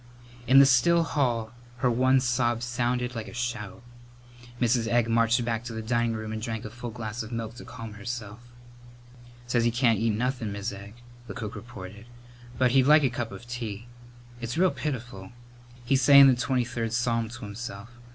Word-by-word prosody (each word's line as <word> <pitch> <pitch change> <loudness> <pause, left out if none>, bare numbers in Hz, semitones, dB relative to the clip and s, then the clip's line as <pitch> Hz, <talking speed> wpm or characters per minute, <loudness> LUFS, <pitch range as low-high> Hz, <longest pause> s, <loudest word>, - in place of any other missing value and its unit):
In 130 +2 +6
the 140 - +9
still 140 +7 +4
hall 120 -8 -1 0.3
her 125 0 +1
one 130 +3 +3
sob 120 -2 0
sounded 120 +1 -1
like 115 -2 -5
a - - -10
shout. 120 -4 -4 0.8
Mrs. 120 -1 +2
Egg 115 0 +2
marched 115 +1 +2
back 115 -1 -2
to 115 - -6
the 110 - -4
dining 120 0 0
room 110 -1 -5
and 110 - -4
drank 110 0 -4
a 110 - -7
full 120 +1 -7
glass 110 0 -5
of 110 +1 -8
milk 115 -1 -4
to - - -10
calm 115 -3 -8
herself. 110 0 -6 1.1
"Says 120 -1 +1
he 120 - +3
can't 115 -2 +2
eat 115 - +1
nothin', 125 -2 -2
Mis' 100 +2 -4
Egg," 100 +2 -10 0.3
the 100 - -7
cook 110 -3 -5
reported, 105 -3 -10 0.5
"but 130 -1 +3
he'd 130 0 +4
like 150 0 +6
a 130 - +2
cup 120 -2 -4
of 100 +5 -10
tea. 115 -3 -5 0.6
It's 120 +5 -4
real 185 +1 +4
pitiful. 120 -8 -5 0.5
He's 135 +2 +2
sayin' 140 +1 +9
the 135 - +6
Twenty 125 0 0
third 115 -2 -3
Psalm 115 -2 0
to 120 - -10
himself. 100 +1 -8
120 Hz, 190 wpm, -27 LUFS, 110-125 Hz, 1.1 s, the